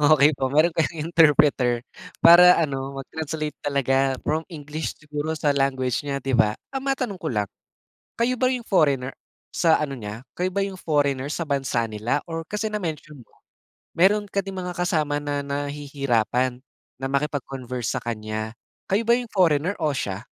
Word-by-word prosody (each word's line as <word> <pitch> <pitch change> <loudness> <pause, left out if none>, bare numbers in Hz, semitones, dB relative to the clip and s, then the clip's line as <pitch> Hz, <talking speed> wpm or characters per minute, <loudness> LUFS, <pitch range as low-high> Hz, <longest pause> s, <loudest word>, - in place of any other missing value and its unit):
okey 150 0 +6
po 135 -2 -1
meron 155 +5 +3
kayong 160 -1 -1
interpreter, 140 -7 +4 0.4
para 180 +1 +9
ano 135 -3 -2
mag 135 - -5
translate 155 -1 -3
talaga 135 -1 +1
from 155 +1 +1
English 155 -2 -5
siguro 150 +1 -4
sa 150 -1 +1
language 130 -3 0
nya 140 -1 -1
di 135 - -2
ba? 105 -2 +3 0.2
Ah, 270 - -2
matanong 255 -8 -2
ko 165 - -3
lang, 105 -2 -1 0.7
kayo 245 +2 +2
ba 255 +1 +2
yung 250 -3 -3
foreigner 140 -8 +2 0.4
sa 165 -2 +4
ano 145 -2 -2
niya 105 -3 -7 0.2
kayo 185 +1 -1
ba 200 - -1
yung 195 -1 -6
foreigner 145 -5 0
sa 170 +1 -3
bansa 135 -5 0
nila 110 +5 -1
or 165 -1 -4
kasi 210 +6 -3
na 210 0 -2
mention 150 -4 -6
mo - - -34 0.6
meron 200 +4 +3
ka 200 - 0
ding 195 0 -5
mga 180 -1 -4
kasama 155 -5 0
na 145 -1 -2
nahihirapan 140 -4 -1 0.3
na 135 - -5
makipag-converse 135 -4 -2
sa - - -2
kanya, 110 -1 -4 0.3
kayo 200 +4 +2
ba 235 - +3
yung 245 - -6
foreigner 175 -1 +2
o 155 -2 0
siya? 100 -8 -3
145 Hz, 170 wpm, -24 LUFS, 135-170 Hz, 0.7 s, para